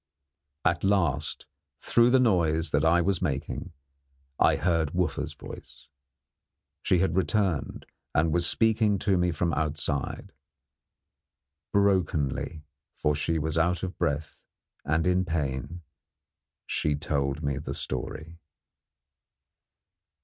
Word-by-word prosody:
At -, -, +2 dB
last 85 Hz, -7 st, +1 dB, 0.3 s
through 120 Hz, 0 st, +4 dB
the 130 Hz, +1 st, +5 dB
noise 85 Hz, -9 st, +2 dB
that 75 Hz, +1 st, +2 dB
I 85 Hz, +2 st, +4 dB
was 95 Hz, -1 st, 0 dB
making 70 Hz, +2 st, -3 dB, 0.7 s
I -, -, +5 dB
heard 85 Hz, -3 st, 0 dB
Wooffa's 90 Hz, -5 st, -1 dB
voice. -, -, -12 dB, 0.9 s
She 95 Hz, -, +2 dB
had 85 Hz, -1 st, +1 dB
returned, 95 Hz, -2 st, 0 dB, 0.3 s
and 80 Hz, +2 st, +2 dB
was 85 Hz, 0 st, +3 dB
speaking 110 Hz, -2 st, +2 dB
to 95 Hz, 0 st, +1 dB
me 90 Hz, 0 st, +2 dB
from 85 Hz, 0 st, -1 dB
outside. 75 Hz, -2 st, -2 dB, 1.4 s
Brokenly 80 Hz, -7 st, +1 dB, 0.3 s
for 75 Hz, -, +1 dB
she 80 Hz, +3 st, -1 dB
was 80 Hz, +1 st, -1 dB
out 85 Hz, +2 st, +1 dB
of 95 Hz, 0 st, -4 dB
breath, 75 Hz, +2 st, -2 dB, 0.4 s
and 80 Hz, +2 st, 0 dB
in 90 Hz, +1 st, +2 dB
pain 80 Hz, 0 st, -3 dB, 0.8 s
she 75 Hz, -1 st, 0 dB
told 70 Hz, 0 st, -2 dB
me 70 Hz, -1 st, -1 dB
the 75 Hz, -, -5 dB
story. 80 Hz, +6 st, -5 dB
80 Hz, 115 wpm, -27 LUFS, 75-90 Hz, 1.4 s, the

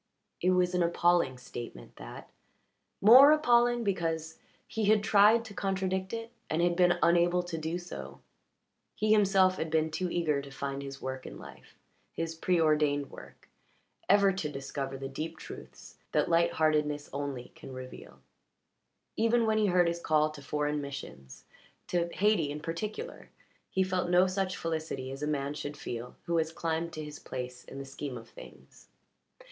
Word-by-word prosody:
It 180 Hz, -, +3 dB
was 180 Hz, -1 st, +2 dB
an 180 Hz, -, +1 dB
appalling 170 Hz, -5 st, +2 dB
statement, 120 Hz, -, -9 dB
that -, -, -10 dB, 0.7 s
more 255 Hz, +8 st, +9 dB
appalling 240 Hz, -5 st, +4 dB
because 165 Hz, -5 st, -2 dB, 0.3 s
he 220 Hz, -1 st, -2 dB
had 210 Hz, 0 st, +4 dB
tried 210 Hz, +3 st, +5 dB
to 210 Hz, -, -9 dB
contradict 190 Hz, -1 st, -2 dB
it 230 Hz, 0 st, -5 dB, 0.2 s
and 155 Hz, -, 0 dB
had 175 Hz, 0 st, +2 dB
been 175 Hz, 0 st, +4 dB
unable 175 Hz, +1 st, +4 dB
to 175 Hz, -1 st, -5 dB
do 160 Hz, +2 st, -2 dB
so. 175 Hz, 0 st, -8 dB, 0.8 s
He 215 Hz, 0 st, +1 dB
himself 195 Hz, -3 st, +4 dB
had 160 Hz, -, -2 dB
been 160 Hz, 0 st, +1 dB
too 180 Hz, +3 st, -2 dB
eager 155 Hz, -5 st, 0 dB
to 140 Hz, -, -10 dB
find 140 Hz, 0 st, -4 dB
his 135 Hz, -1 st, -8 dB
work 130 Hz, 0 st, -5 dB
in -, -, -9 dB
life -, -, -14 dB, 0.4 s
his 165 Hz, 0 st, -3 dB
pre 175 Hz, +2 st, +1 dB
ordained 150 Hz, -3 st, +2 dB
work -, -, -13 dB, 0.6 s
ever 200 Hz, -1 st, +5 dB
to 175 Hz, -5 st, -3 dB
discover 135 Hz, -1 st, -5 dB
the 135 Hz, 0 st, -5 dB
deep 155 Hz, +5 st, -5 dB
truths -, -, -11 dB
that -, -, +2 dB
light 170 Hz, 0 st, +3 dB
heartedness 150 Hz, -2 st, +1 dB
only 140 Hz, -3 st, -4 dB
can -, -, -11 dB
reveal; 130 Hz, 0 st, -10 dB, 0.9 s
even 230 Hz, +1 st, +3 dB
when 220 Hz, 0 st, +2 dB
he 210 Hz, -, +3 dB
heard 180 Hz, -2 st, +4 dB
his 170 Hz, 0 st, -1 dB
call 155 Hz, -2 st, +2 dB
to 150 Hz, -2 st, -11 dB
foreign 150 Hz, +1 st, -1 dB
missions 70 Hz, -, -9 dB, 0.4 s
to 175 Hz, -1 st, 0 dB
Hayti, 200 Hz, -7 st, +2 dB
in 145 Hz, +1 st, -4 dB
particular 210 Hz, -, -5 dB, 0.4 s
he 190 Hz, -, +1 dB
felt 185 Hz, -1 st, -1 dB
no 180 Hz, +1 st, +5 dB
such 185 Hz, 0 st, -1 dB
felicity 160 Hz, -5 st, -3 dB
as 135 Hz, +1 st, -7 dB
a 150 Hz, -, -1 dB
man 140 Hz, -1 st, -1 dB
should 145 Hz, 0 st, -6 dB
feel 120 Hz, -3 st, -6 dB
who 170 Hz, -1 st, 0 dB
has 160 Hz, 0 st, -1 dB
climbed 165 Hz, 0 st, -2 dB
to 155 Hz, -, -5 dB
his 150 Hz, 0 st, -9 dB
place 125 Hz, -1 st, -6 dB
in 135 Hz, -, -10 dB
the 140 Hz, -, -6 dB
scheme 135 Hz, -1 st, -6 dB
of 115 Hz, 0 st, -11 dB
things. -, -, -15 dB
165 Hz, 170 wpm, -30 LUFS, 145-185 Hz, 0.9 s, more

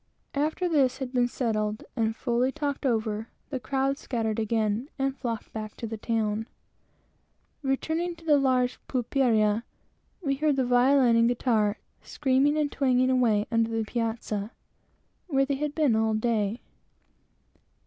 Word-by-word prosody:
After 310 Hz, +5 st, 0 dB
this 275 Hz, -6 st, +2 dB
had 265 Hz, -1 st, -5 dB
been 245 Hz, -1 st, +3 dB
settled, 215 Hz, -3 st, -2 dB
and 225 Hz, -2 st, 0 dB
fully 245 Hz, +2 st, 0 dB
talked 285 Hz, -2 st, -2 dB
over, 220 Hz, -2 st, -1 dB, 0.2 s
the 265 Hz, -, -2 dB
crowd 270 Hz, +2 st, -1 dB
scattered 225 Hz, -3 st, -2 dB
again 220 Hz, +3 st, 0 dB
and 270 Hz, -1 st, 0 dB
flocked 235 Hz, -5 st, -5 dB
back 215 Hz, -1 st, -6 dB
to -, -, -5 dB
the 225 Hz, 0 st, -4 dB
town. 220 Hz, 0 st, -1 dB, 1.1 s
Returning 320 Hz, +5 st, -1 dB
to 330 Hz, -, -17 dB
the 295 Hz, -3 st, +5 dB
large 255 Hz, -2 st, +1 dB
pulperia, 230 Hz, -4 st, +2 dB, 0.6 s
we 275 Hz, -3 st, 0 dB
found 295 Hz, -1 st, +1 dB
the 260 Hz, -, +2 dB
violin 245 Hz, 0 st, +4 dB
and 230 Hz, 0 st, +5 dB
guitar 225 Hz, -4 st, +1 dB, 0.2 s
screaming 280 Hz, +2 st, +1 dB
and 295 Hz, -2 st, 0 dB
twanging 255 Hz, -1 st, +2 dB
away 225 Hz, -5 st, +3 dB
under 230 Hz, -1 st, +2 dB
the 225 Hz, -1 st, -1 dB
piazza, 225 Hz, -3 st, -2 dB, 0.8 s
where 275 Hz, -5 st, +2 dB
they 280 Hz, -, -1 dB
had 290 Hz, +1 st, -3 dB
been 295 Hz, -8 st, +3 dB
all 220 Hz, 0 st, +2 dB
day. 220 Hz, -1 st, 0 dB
245 Hz, 145 wpm, -27 LUFS, 225-275 Hz, 1.1 s, the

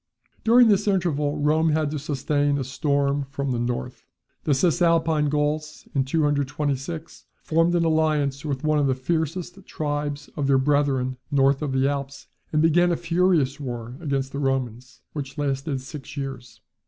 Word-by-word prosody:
During 240 Hz, +1 st, +6 dB
this 210 Hz, -1 st, +3 dB
interval 155 Hz, -7 st, +1 dB
Rome 155 Hz, +2 st, +2 dB
had 155 Hz, -2 st, 0 dB
to 150 Hz, -, -3 dB
sustain 145 Hz, 0 st, 0 dB
a 135 Hz, -, -1 dB
storm 140 Hz, 0 st, 0 dB
from 140 Hz, -1 st, -3 dB
the 120 Hz, -, -1 dB
north. 120 Hz, -, -3 dB, 0.4 s
The 145 Hz, -, +3 dB
Cisalpine 165 Hz, -1 st, +2 dB
Gauls, 150 Hz, +1 st, -2 dB
in 135 Hz, -2 st, +1 dB
226, 145 Hz, +1 st, -2 dB, 0.2 s
formed 165 Hz, +2 st, +2 dB
an 170 Hz, -1 st, +2 dB
alliance 155 Hz, -4 st, +1 dB
with 140 Hz, -3 st, -3 dB
one 155 Hz, -1 st, +2 dB
of 140 Hz, -, +2 dB
the 130 Hz, -, +1 dB
fiercest 165 Hz, +6 st, -3 dB
tribes 145 Hz, -1 st, -3 dB
of 140 Hz, -2 st, -1 dB
their 135 Hz, -1 st, +4 dB
brethren 130 Hz, -2 st, +1 dB
north 140 Hz, -1 st, +3 dB
of 150 Hz, -3 st, -2 dB
the 130 Hz, +1 st, +2 dB
Alps, 140 Hz, -1 st, -4 dB, 0.3 s
and 155 Hz, 0 st, +2 dB
began 175 Hz, +2 st, +4 dB
a 170 Hz, -, +1 dB
furious 165 Hz, -5 st, +1 dB
war 120 Hz, -3 st, -5 dB
against 140 Hz, -4 st, -2 dB
the 140 Hz, -, -4 dB
Romans, 130 Hz, -3 st, -2 dB
which 140 Hz, -1 st, -6 dB
lasted 135 Hz, -1 st, -2 dB
six 140 Hz, +1 st, -9 dB
years. 135 Hz, -3 st, -6 dB
145 Hz, 160 wpm, -24 LUFS, 135-155 Hz, 0.4 s, During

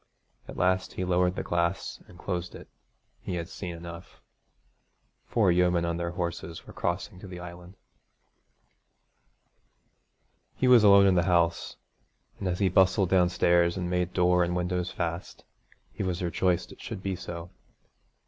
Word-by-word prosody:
At -, -, -9 dB
last 95 Hz, +1 st, +1 dB
he 95 Hz, -, -3 dB
lowered 90 Hz, 0 st, +2 dB
the -, -, -3 dB
glass 85 Hz, +2 st, -1 dB
and 90 Hz, -, -15 dB
closed 90 Hz, -1 st, -4 dB
it. -, -, -11 dB, 0.5 s
He 90 Hz, -, -5 dB
had 85 Hz, -1 st, -4 dB
seen 90 Hz, -2 st, -6 dB
enough. 85 Hz, 0 st, -10 dB, 1.1 s
Four 105 Hz, -6 st, +3 dB
yeomen 90 Hz, -1 st, +2 dB
on 85 Hz, 0 st, -1 dB
their 85 Hz, 0 st, -2 dB
horses 85 Hz, 0 st, -5 dB
were -, -, -12 dB
crossing 85 Hz, +1 st, -3 dB
to 100 Hz, -, -10 dB
the 90 Hz, -1 st, -8 dB
island. 90 Hz, +1 st, -10 dB, 2.8 s
He 130 Hz, -, +1 dB
was 125 Hz, -3 st, +7 dB
alone 100 Hz, -1 st, +7 dB
in 95 Hz, -, +5 dB
the 85 Hz, -1 st, +2 dB
house, 85 Hz, -1 st, +1 dB, 0.6 s
and 95 Hz, -, -3 dB
as 90 Hz, -1 st, -1 dB
he 100 Hz, -, +2 dB
bustled 95 Hz, +1 st, +3 dB
downstairs 90 Hz, -1 st, +3 dB
and 90 Hz, -1 st, -3 dB
made 90 Hz, 0 st, 0 dB
door 90 Hz, -1 st, +3 dB
and 85 Hz, 0 st, -1 dB
windows 90 Hz, 0 st, -1 dB
fast, 85 Hz, 0 st, -5 dB, 0.5 s
he 105 Hz, -, -6 dB
was 90 Hz, -1 st, -2 dB
rejoiced 90 Hz, +1 st, 0 dB
it -, -, -13 dB
should 95 Hz, -, -7 dB
be 95 Hz, -1 st, -2 dB
so. 85 Hz, -1 st, -8 dB
90 Hz, 155 wpm, -28 LUFS, 85-95 Hz, 2.8 s, was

